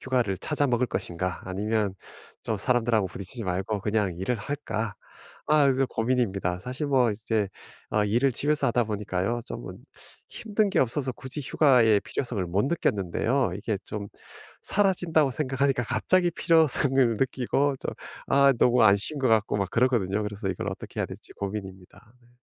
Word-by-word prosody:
휴가를 120 Hz, -8 st, 0 dB
찾아 145 Hz, +3 st, 0 dB
먹을 125 Hz, 0 st, +2 dB
것인가? 90 Hz, -4 st, -3 dB
아니면 100 Hz, +1 st, -1 dB, 0.5 s
좀 -, -, -2 dB
사람들하고 115 Hz, -5 st, +1 dB
부딪히지 100 Hz, +6 st, -6 dB
말고 95 Hz, +3 st, -2 dB
그냥 105 Hz, -4 st, 0 dB
일을 95 Hz, +7 st, -1 dB
할까?' 110 Hz, -3 st, -4 dB, 0.5 s
아 150 Hz, -2 st, +4 dB
요즘 135 Hz, 0 st, +2 dB
고민입니다. 110 Hz, -7 st, 0 dB
사실 130 Hz, -, -4 dB
뭐 125 Hz, -4 st, +3 dB
이제 105 Hz, -1 st, -1 dB, 0.4 s
어 105 Hz, -1 st, +2 dB
일을 120 Hz, +6 st, +2 dB
집에서 145 Hz, +2 st, +1 dB
하다 120 Hz, 0 st, +2 dB
보니까요 105 Hz, +1 st, -2 dB
쪼금은 -, -, -8 dB, 0.4 s
힘든 215 Hz, -1 st, -1 dB
게 190 Hz, -, +1 dB
없어서 130 Hz, +1 st, 0 dB
굳이 130 Hz, +4 st, -7 dB
휴가의 125 Hz, -7 st, +4 dB
필요성을 120 Hz, -7 st, -3 dB
못 100 Hz, +8 st, 0 dB
느꼈는데요 120 Hz, -, 0 dB
이게 105 Hz, +1 st, -2 dB
좀 105 Hz, -1 st, -5 dB, 0.6 s
사라진다고 175 Hz, -7 st, +2 dB
생각하니까 135 Hz, -2 st, 0 dB
갑자기 175 Hz, +11 st, +2 dB
필요성을 135 Hz, -8 st, +3 dB
느끼고 135 Hz, +2 st, 0 dB
좀 -, -, -3 dB, 0.4 s
아 140 Hz, 0 st, +5 dB
너무 125 Hz, 0 st, +4 dB
안 100 Hz, -1 st, +7 dB
쉰 145 Hz, +9 st, -3 dB
것 130 Hz, -3 st, +1 dB
같고 110 Hz, -2 st, +2 dB
막 100 Hz, -, -1 dB
그렇거든요. 110 Hz, -5 st, +1 dB
그래서 105 Hz, -1 st, -4 dB
이걸 95 Hz, -, -3 dB
어떻게 -, -, -6 dB
해야 -, -, 0 dB
될지 -, -, -11 dB
고민입니다 100 Hz, +2 st, -7 dB
네. 120 Hz, -, -25 dB
120 Hz, 365 characters per minute, -26 LUFS, 100-135 Hz, 0.6 s, 안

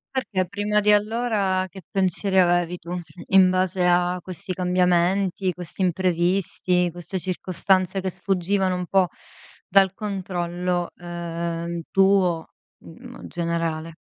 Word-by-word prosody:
Perché 195 Hz, -8 st, -1 dB
prima 205 Hz, +2 st, 0 dB
di 210 Hz, 0 st, +3 dB
allora 210 Hz, -3 st, +1 dB
che 190 Hz, +1 st, -11 dB
pensieri 190 Hz, 0 st, +1 dB
avevi 175 Hz, -1 st, +2 dB
tu, 170 Hz, -, -12 dB, 0.4 s
in 190 Hz, -1 st, +6 dB
base 185 Hz, 0 st, +1 dB
a 180 Hz, 0 st, +2 dB
questi 185 Hz, +1 st, -5 dB
cambiamenti, 180 Hz, +1 st, +1 dB
questi 180 Hz, +2 st, -6 dB
imprevisti, 180 Hz, 0 st, +1 dB
queste 175 Hz, +2 st, -6 dB
circostanze 185 Hz, +1 st, +1 dB
che 190 Hz, -, -2 dB
sfuggivano 190 Hz, 0 st, 0 dB
un 180 Hz, 0 st, -3 dB
po' 190 Hz, -1 st, +2 dB, 0.6 s
dal 195 Hz, -1 st, +4 dB
controllo, 180 Hz, -3 st, -3 dB
ehm, 170 Hz, -1 st, -4 dB
tuo, 190 Hz, -4 st, +3 dB, 0.3 s
generale? 165 Hz, -, -5 dB
180 Hz, 110 wpm, -23 LUFS, 175-195 Hz, 0.6 s, in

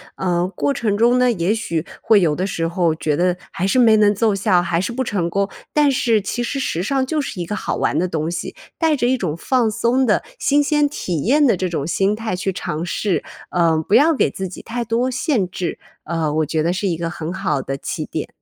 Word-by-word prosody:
呃 180 Hz, -1 st, 0 dB
过 280 Hz, -, 0 dB
程 225 Hz, -7 st, -1 dB
中 240 Hz, +3 st, +4 dB
呢， 250 Hz, 0 st, +4 dB
也 195 Hz, -3 st, +1 dB
许 170 Hz, -8 st, -2 dB, 0.2 s
会 215 Hz, -3 st, +4 dB
有 160 Hz, -4 st, +2 dB
的 185 Hz, +5 st, -2 dB
时 165 Hz, -4 st, -2 dB
候 170 Hz, -2 st, +1 dB
觉 155 Hz, -2 st, -1 dB
得 180 Hz, +1 st, +2 dB, 0.2 s
还 185 Hz, -, -1 dB
是 195 Hz, -, +1 dB
没 225 Hz, -3 st, +6 dB
能 210 Hz, -1 st, +4 dB
奏 220 Hz, +1 st, +2 dB
效 185 Hz, -2 st, +2 dB
还 170 Hz, -1 st, 0 dB
是 190 Hz, +6 st, -2 dB
不 260 Hz, +2 st, -1 dB
成 190 Hz, -8 st, -1 dB
功。 195 Hz, +3 st, 0 dB, 0.2 s
但 295 Hz, -2 st, +4 dB
是 230 Hz, -4 st, +2 dB
其 220 Hz, +5 st, -3 dB
实 275 Hz, -, -3 dB
时 175 Hz, -10 st, -1 dB
尚 265 Hz, +7 st, 0 dB
就 305 Hz, +4 st, -1 dB
是 275 Hz, -10 st, -4 dB
一 -, -, -3 dB
个 210 Hz, -, -3 dB
好 -, -, -2 dB
玩 -, -, 0 dB
的 180 Hz, -, +1 dB
东 160 Hz, -1 st, -2 dB
西， 175 Hz, -, -5 dB, 0.2 s
带 320 Hz, -2 st, +2 dB
着 245 Hz, -4 st, 0 dB
一 260 Hz, +1 st, +2 dB
种 170 Hz, -9 st, -2 dB
放 245 Hz, +4 st, +1 dB
松 240 Hz, +4 st, +1 dB
的 215 Hz, -, +2 dB, 0.2 s
新 290 Hz, +1 st, +3 dB
鲜 295 Hz, 0 st, +2 dB
体 175 Hz, -, -3 dB
验 290 Hz, +6 st, +4 dB
的 230 Hz, -8 st, +3 dB
这 185 Hz, -, -1 dB
种 165 Hz, -5 st, -3 dB
心 195 Hz, +5 st, +1 dB
态 220 Hz, -3 st, -3 dB
去 190 Hz, +1 st, -2 dB
尝 160 Hz, -2 st, -4 dB
试， 180 Hz, -2 st, -1 dB, 0.3 s
呃 170 Hz, -2 st, +2 dB
不 205 Hz, -, +3 dB
要 300 Hz, +7 st, +5 dB
给 -, -, +2 dB
自 190 Hz, -, -4 dB
己 180 Hz, -, -9 dB
太 240 Hz, +1 st, -4 dB
多 235 Hz, +3 st, 0 dB
限 255 Hz, -, 0 dB
制， 180 Hz, -1 st, -4 dB, 0.3 s
呃 160 Hz, -2 st, -1 dB
我 155 Hz, 0 st, +1 dB
觉 155 Hz, +1 st, -1 dB
得 170 Hz, -, +1 dB
是 185 Hz, +3 st, -1 dB
一 175 Hz, -, 0 dB
个 165 Hz, 0 st, -3 dB
很 170 Hz, 0 st, -5 dB
好 185 Hz, -8 st, -1 dB
的 135 Hz, -, -4 dB
起 135 Hz, -, -4 dB
点。 -, -, -4 dB
195 Hz, 265 characters per minute, -20 LUFS, 170-240 Hz, 0.3 s, 没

